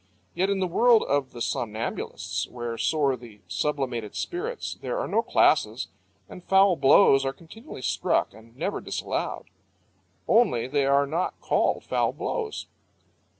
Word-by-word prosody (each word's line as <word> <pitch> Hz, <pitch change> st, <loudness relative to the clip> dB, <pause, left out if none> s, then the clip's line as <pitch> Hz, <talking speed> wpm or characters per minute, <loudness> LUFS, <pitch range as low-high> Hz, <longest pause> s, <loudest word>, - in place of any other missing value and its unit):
Yet 190 Hz, +2 st, 0 dB
in 200 Hz, -, +1 dB
the 190 Hz, -1 st, 0 dB
world 235 Hz, +6 st, +4 dB
of 140 Hz, -2 st, 0 dB
the 120 Hz, -, -9 dB
somnambulists, 110 Hz, -1 st, -3 dB
where 120 Hz, -1 st, -5 dB
soar 140 Hz, +2 st, +1 dB
the 115 Hz, -4 st, -14 dB
sublimated 120 Hz, +1 st, -2 dB
spirits, 440 Hz, +7 st, -4 dB
there -, -, -3 dB
are -, -, -2 dB
no -, -, +2 dB
classes, -, -, +2 dB, 0.4 s
and 180 Hz, -, -11 dB
foul 195 Hz, 0 st, +5 dB
blows 135 Hz, -1 st, +5 dB
are 135 Hz, 0 st, -1 dB
continually 170 Hz, -, -12 dB
struck -, -, 0 dB
and 115 Hz, +2 st, -17 dB
never 185 Hz, +7 st, -2 dB
disallowed. -, -, -4 dB, 0.8 s
Only 215 Hz, -, +3 dB
they 140 Hz, 0 st, +1 dB
are 140 Hz, +1 st, +4 dB
not 165 Hz, +6 st, -2 dB
called -, -, +1 dB
foul -, -, 0 dB
blows. 445 Hz, -3 st, -4 dB
140 Hz, 145 wpm, -26 LUFS, 120-195 Hz, 0.8 s, foul